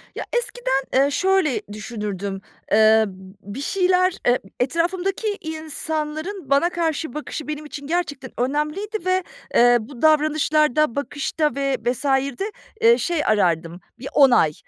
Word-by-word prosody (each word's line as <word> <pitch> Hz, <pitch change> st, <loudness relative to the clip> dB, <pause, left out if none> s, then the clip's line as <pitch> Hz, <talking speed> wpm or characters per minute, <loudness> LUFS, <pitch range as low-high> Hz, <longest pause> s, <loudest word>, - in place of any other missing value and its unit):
Ya, -, -, -4 dB
eskiden, 480 Hz, -, 0 dB
ııı, 280 Hz, +1 st, +2 dB
şöyle 375 Hz, -4 st, +2 dB
düşünürdüm, 205 Hz, -3 st, -5 dB, 0.3 s
ııı, 220 Hz, 0 st, +6 dB
b 195 Hz, -, -9 dB, 0.3 s
bir 205 Hz, +7 st, -7 dB
şeyler, 365 Hz, +2 st, +2 dB
ııı, 245 Hz, +1 st, +5 dB, 0.2 s
etrafımdaki 365 Hz, -, -1 dB
insanların 315 Hz, +1 st, -4 dB
bana 280 Hz, +5 st, +3 dB
karşı 320 Hz, -5 st, -2 dB
bakışı 300 Hz, 0 st, -6 dB
benim 305 Hz, 0 st, -5 dB
için 285 Hz, -1 st, -8 dB
gerçekten 290 Hz, -6 st, -2 dB
önemliydi 300 Hz, -, -1 dB
ve, 370 Hz, 0 st, +2 dB, 0.3 s
eee, 245 Hz, 0 st, +6 dB
bu 240 Hz, +2 st, -11 dB
davranışlarda, 305 Hz, -3 st, +3 dB
bakışta 290 Hz, +1 st, -1 dB
ve 275 Hz, -1 st, 0 dB
vs.'de, 270 Hz, -, 0 dB, 0.3 s
ııı, 470 Hz, +1 st, +6 dB
şey 340 Hz, -4 st, 0 dB
arardım, 175 Hz, -4 st, +1 dB, 0.2 s
bir 255 Hz, -, -7 dB
onay. 245 Hz, -, +5 dB
295 Hz, 125 wpm, -22 LUFS, 245-335 Hz, 0.3 s, ııı